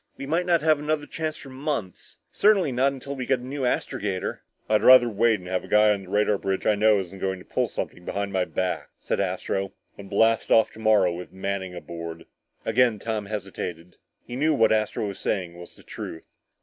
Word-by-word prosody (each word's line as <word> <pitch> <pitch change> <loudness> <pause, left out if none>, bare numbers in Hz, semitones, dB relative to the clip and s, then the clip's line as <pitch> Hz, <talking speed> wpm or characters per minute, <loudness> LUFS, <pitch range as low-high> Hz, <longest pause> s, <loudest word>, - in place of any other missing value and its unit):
We 140 - -6
might 165 +5 0
not 170 -3 +3
have 155 -2 +4
another 150 0 -1
chance 155 0 -4
for 135 - -11
months! 130 - -4
Certainly 200 -8 +3
not 130 +2 +2
until 140 +1 -6
we 130 -2 -5
get 135 - +3
a 125 - -11
new 130 0 -2
astrogator." 100 -5 -2 0.3
"I'd 110 -1 +3
rather 130 -1 +8
wait 115 0 +2
and 90 -2 -12
have 95 0 -1
a - - -10
guy 105 0 +5
on 100 -1 0
the - - -14
radar 105 0 +2
bridge 95 -1 -2
I 110 - +4
know 105 0 +4
isn't 95 0 -7
going 95 0 -1
to 90 - -14
pull - - 0
something 90 - -5
behind 100 +2 -3
my 95 -1 +1
back," 95 0 -2
said - - -2
Astro, 95 0 -2 0.2
"than 100 - -10
blast 115 +3 +2
off 110 - +5
tomorrow 110 -5 +3
with 90 +1 -8
Manning 95 -1 -4
aboard." 85 -1 -7 0.4
Again 115 0 +3
Tom 105 -1 -3
hesitated. 90 -4 -6 0.3
He 120 - -7
knew 155 +4 +2
what 115 -4 +4
Astro 110 0 0
was 100 -1 -6
saying 90 -4 -2
was 85 0 -11
the - - -17
truth. 80 - -9
105 Hz, 210 wpm, -25 LUFS, 95-130 Hz, 0.4 s, rather